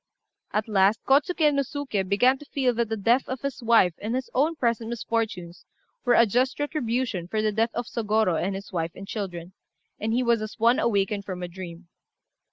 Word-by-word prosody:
At 210 Hz, +1 st, -1 dB
last 205 Hz, 0 st, +3 dB
Kôtsuké 300 Hz, +2 st, +3 dB
no 280 Hz, -, +2 dB
Suké 275 Hz, -6 st, -3 dB
began 245 Hz, +6 st, +4 dB
to 295 Hz, -, -12 dB
feel 265 Hz, -3 st, 0 dB
that 235 Hz, -1 st, -1 dB
the 225 Hz, -, -2 dB
death 235 Hz, +6 st, +2 dB
of 260 Hz, -1 st, -4 dB
his 275 Hz, -1 st, -4 dB
wife 225 Hz, -7 st, +4 dB
and 220 Hz, +4 st, -3 dB
his 260 Hz, 0 st, -4 dB
own 305 Hz, +6 st, +2 dB
present 235 Hz, -5 st, -1 dB
misfortunes 220 Hz, -7 st, -3 dB, 0.4 s
were 245 Hz, -, +4 dB
a 235 Hz, -, +6 dB
just 250 Hz, +6 st, 0 dB
retribution 245 Hz, -, -2 dB
for 215 Hz, +3 st, -1 dB
the 215 Hz, -, +2 dB
death 225 Hz, +2 st, +1 dB
of 240 Hz, -, -2 dB
Sôgorô 215 Hz, -7 st, 0 dB
and 195 Hz, +2 st, -1 dB
his 195 Hz, 0 st, -8 dB
wife 165 Hz, -1 st, -2 dB
and 195 Hz, -, -9 dB
children, 185 Hz, -4 st, -5 dB, 0.5 s
and 220 Hz, +1 st, -2 dB
he 245 Hz, +3 st, +1 dB
was 235 Hz, -2 st, +2 dB
as 215 Hz, 0 st, -6 dB
one 235 Hz, +3 st, +4 dB
awakened 200 Hz, -2 st, +1 dB
from 180 Hz, -2 st, -5 dB
a -, -, -3 dB
dream. 175 Hz, -1 st, -9 dB
225 Hz, 200 wpm, -26 LUFS, 195-250 Hz, 0.5 s, a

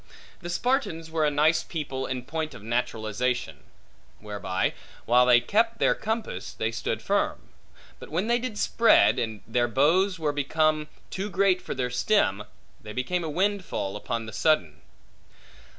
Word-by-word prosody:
The 175 Hz, -, -6 dB
Spartans 175 Hz, -, -1 dB
were 160 Hz, -2 st, +2 dB
a -, -, +3 dB
nice 155 Hz, +3 st, +3 dB
people 135 Hz, -5 st, -4 dB
in 130 Hz, -2 st, -4 dB
point 155 Hz, +2 st, -4 dB
of 105 Hz, -, -11 dB
naturalization; 120 Hz, +1 st, -2 dB, 0.6 s
whereby, 100 Hz, -3 st, -2 dB, 0.3 s
while 125 Hz, +2 st, +5 dB
they 120 Hz, -1 st, +7 dB
kept 225 Hz, -, +1 dB
their -, -, +3 dB
compass, 220 Hz, 0 st, -4 dB
they 110 Hz, +1 st, -2 dB
stood 110 Hz, -, -3 dB
firm; -, -, -1 dB, 0.5 s
but -, -, -10 dB
when 175 Hz, +6 st, -1 dB
they 240 Hz, +1 st, +2 dB
did 240 Hz, -4 st, -5 dB
spread, 230 Hz, +2 st, +4 dB
and 110 Hz, -3 st, -3 dB
their 120 Hz, +1 st, +1 dB
boughs 170 Hz, -, +3 dB
were 155 Hz, -3 st, -1 dB
becomen 155 Hz, +2 st, +1 dB, 0.2 s
too 195 Hz, +2 st, -3 dB
great 190 Hz, -1 st, +2 dB
for -, -, -5 dB
their 125 Hz, -1 st, -2 dB
stem, 125 Hz, -, +1 dB, 0.4 s
they 105 Hz, -1 st, -8 dB
became 170 Hz, +9 st, -1 dB
a 160 Hz, -, -3 dB
windfall, 185 Hz, -, -1 dB
upon 115 Hz, +2 st, -3 dB
the 110 Hz, -, -9 dB
sudden. 90 Hz, -, +1 dB
150 Hz, 155 wpm, -26 LUFS, 120-185 Hz, 0.6 s, they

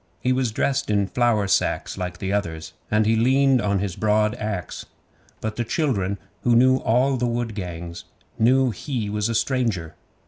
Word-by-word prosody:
He 130 Hz, -, +1 dB
was 130 Hz, -3 st, 0 dB
dressed 140 Hz, +4 st, 0 dB
in 100 Hz, -1 st, +2 dB
flour 115 Hz, -1 st, +1 dB
sacks -, -, 0 dB
like 90 Hz, -1 st, -4 dB
the 95 Hz, +2 st, -3 dB
others, 80 Hz, -6 st, -3 dB, 0.2 s
and 105 Hz, 0 st, +2 dB
he 110 Hz, +1 st, +3 dB
leaned 130 Hz, +2 st, +3 dB
on 100 Hz, -1 st, +1 dB
his 95 Hz, -2 st, -3 dB
broad 105 Hz, 0 st, +2 dB
axe, 105 Hz, -5 st, -4 dB, 0.5 s
but 110 Hz, 0 st, -4 dB
the 120 Hz, -, 0 dB
children, 105 Hz, -, -1 dB, 0.2 s
who 120 Hz, -1 st, +3 dB
knew 130 Hz, +2 st, +5 dB
all 130 Hz, +3 st, +2 dB
the 125 Hz, 0 st, 0 dB
wood 120 Hz, -1 st, -2 dB
gangs, 85 Hz, -3 st, -6 dB, 0.3 s
knew 130 Hz, +2 st, +4 dB
he 115 Hz, -4 st, -4 dB
was 105 Hz, +1 st, -1 dB
a 115 Hz, -, -1 dB
stranger. 110 Hz, -, 0 dB
110 Hz, 175 wpm, -23 LUFS, 100-125 Hz, 0.5 s, knew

